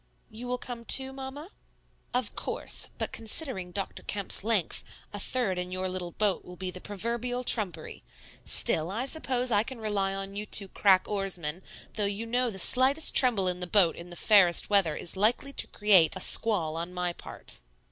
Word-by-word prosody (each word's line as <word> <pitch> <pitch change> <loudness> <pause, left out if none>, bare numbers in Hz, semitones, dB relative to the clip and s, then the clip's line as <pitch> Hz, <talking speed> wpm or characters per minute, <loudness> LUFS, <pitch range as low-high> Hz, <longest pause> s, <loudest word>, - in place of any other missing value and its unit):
"You 230 +3 -8
will 250 0 -2
come 245 -2 -8
too, 265 +3 +3
Mamma?" 270 +6 -9 0.6
"Of 250 -4 -2
course; - - -3
but - - -3
considering 225 - 0
Dr. 195 +1 -5
Kemp's 200 -2 -4
length, 215 -6 -1 0.3
a 205 - -5
third 200 -4 -1
in 180 0 -5
your 185 0 -3
little 180 -2 -6
boat 210 -3 0
will 180 - -12
be 185 0 -5
the 185 - -11
proverbial 235 +5 -4
trumpery. 210 -8 +2 0.4
Still, 160 +2 +4
I 225 +7 -3
suppose 255 -4 -1
I 205 - +3
can 260 +3 -7
rely 200 -3 -2
on 195 0 -7
you 210 +1 -5
two 200 -2 +3
crack 190 -1 +2
oarsmen, 185 -5 -3 0.3
though 210 - -1
you 200 +3 -3
know 245 +2 -1
the 200 - -8
slightest 260 +9 +4
tremble 225 -8 +5
in 180 0 -2
the 180 - -5
boat 180 -3 +3
in 170 +1 -11
the 175 - -11
fairest 195 -2 +3
weather 190 -7 +2
is 170 - -5
likely 230 +8 0
to - - -1
create 195 -6 +3
a - - -4
squall 175 -9 +4
on 170 +2 -6
my 180 -1 -2
part." - - -8
205 Hz, 190 wpm, -27 LUFS, 185-240 Hz, 0.6 s, tremble